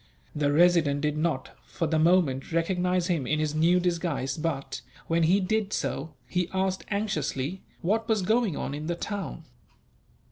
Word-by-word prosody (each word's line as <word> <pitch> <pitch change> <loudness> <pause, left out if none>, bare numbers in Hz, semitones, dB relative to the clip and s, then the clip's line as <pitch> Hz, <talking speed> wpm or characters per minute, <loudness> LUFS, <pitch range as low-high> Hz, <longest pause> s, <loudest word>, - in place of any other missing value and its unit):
The 145 -1 +1
Resident 155 -3 +4
did 150 0 0
not, 155 -4 -1
for 170 - -3
the 160 0 +1
moment, 160 -6 +3
recognize 180 +1 +1
him 165 -8 0
in 155 - +1
his 155 -1 0
new 170 +4 +4
disguise 170 -7 -1
but, 155 -4 -3 0.2
when 165 +1 +1
he 175 +5 +4
did 210 +1 0
so, 155 +4 -3
he 180 -1 -1
asked 190 0 -1
anxiously 185 -5 -2 0.2
what 220 +6 0
was 215 -4 +2
going 220 -4 +2
on - - -3
in 150 +2 -5
the 175 - -1
town. 195 -2 -5
170 Hz, 165 wpm, -27 LUFS, 150-185 Hz, 0.2 s, Resident